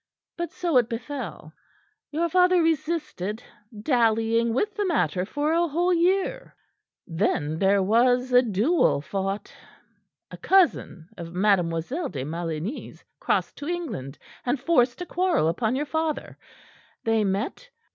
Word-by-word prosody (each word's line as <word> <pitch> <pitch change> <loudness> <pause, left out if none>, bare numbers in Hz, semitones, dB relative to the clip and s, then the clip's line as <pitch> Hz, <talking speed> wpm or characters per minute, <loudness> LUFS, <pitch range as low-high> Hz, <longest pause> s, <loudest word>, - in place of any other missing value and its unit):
But 345 -1 -4
so 335 -3 0
it 240 -2 +3
befell. 230 - -6 0.6
Your 330 +3 0
father 360 +1 +4
resisted, 310 - -2 0.4
dallying 230 -2 +2
with 410 - 0
the 415 -2 -1
matter 180 - 0
for 290 +8 -1
a 340 +1 +2
whole 350 +4 +1
year. 375 +8 0 0.5
Then 160 -3 -1
there 195 +1 +3
was 245 +5 +2
a 250 - +8
duel 230 - +2
fought. 195 +5 -4 0.8
A - - -8
cousin 345 - +2
of 170 0 -8
Mademoiselle 195 - +1
de 130 - -5
Maligny's 165 - -5 0.2
crossed - - 0
to 290 - -6
England, 225 - -4 0.3
and 250 +2 0
forced 255 -2 +2
a - - -8
quarrel 355 - +1
upon 220 +8 0
your 290 +3 -1
father. 315 0 -2 0.7
They 225 -1 +2
met, 195 +1 -1
and - - -19
M. - - -36
245 Hz, 135 wpm, -25 LUFS, -, 0.8 s, a